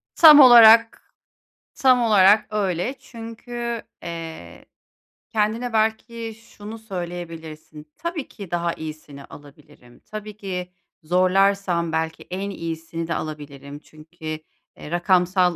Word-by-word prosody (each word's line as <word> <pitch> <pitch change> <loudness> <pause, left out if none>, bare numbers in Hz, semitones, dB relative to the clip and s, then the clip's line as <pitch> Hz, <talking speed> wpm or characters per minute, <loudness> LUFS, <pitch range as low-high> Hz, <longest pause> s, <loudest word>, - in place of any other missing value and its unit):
Tam 305 -3 +9
olarak 230 -3 +7 0.6
tam 255 -2 +3
olarak 210 -1 +4
öyle. 200 +4 -2
Çünkü, 235 -1 -7 0.2
eee, 160 - -8 0.6
kendine 225 +2 -1
belki 225 +1 -1
şunu 225 -1 -11
söyleyebilirsin. 165 -6 -8
Tabii 335 -4 -5
ki, 200 -5 -11
daha 170 -1 -1
iyisini 155 -3 -9
alabilirim. 145 -4 -17
Tabii 215 -1 -8
ki, 180 -3 -6 0.3
zorlarsam 185 0 +1
belki 160 0 -3
en 195 +2 -4
iyisini 165 -2 -6
de 165 - -2
alabilirim. 145 -2 -8
Çünkü, 160 +2 -16
eee, 155 -1 -10
rakamsal 180 0 +2
180 Hz, 105 wpm, -22 LUFS, 160-220 Hz, 0.6 s, Tam